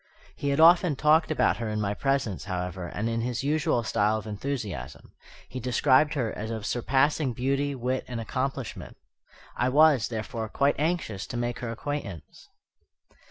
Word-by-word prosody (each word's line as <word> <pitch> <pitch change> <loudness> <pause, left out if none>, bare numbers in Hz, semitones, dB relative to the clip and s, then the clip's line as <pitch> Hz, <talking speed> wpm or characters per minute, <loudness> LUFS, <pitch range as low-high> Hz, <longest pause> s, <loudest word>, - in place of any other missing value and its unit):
He 140 - -2
had 140 +2 0
often 170 -1 +6
talked 155 +3 +3
about 155 - +2
her 115 -2 -3
in 105 0 -2
my 100 -1 0
presence, 135 -7 -1
however, 90 -1 -4
and 100 +7 -3
in 115 0 -1
his 120 +1 -2
usual 155 -3 +1
style 110 0 +1
of 110 - -7
enthusiasm. 105 - -5 0.4
He 130 - -6
described 130 +5 +3
her 120 -6 -1
as 110 +1 -5
of 110 -2 -4
surpassing 135 +3 +1
beauty, 140 +3 -1
wit, 130 +1 -2
and 120 -2 -5
accomplishment. 130 +2 -4 0.6
I 125 - +1
was, 145 -4 +5
therefore, 110 -1 -4
quite 140 +5 +1
anxious 155 - -1
to 120 - -5
make 120 0 -2
her 120 - -4
acquaintance. 115 - -6
125 Hz, 160 wpm, -27 LUFS, 110-140 Hz, 0.6 s, often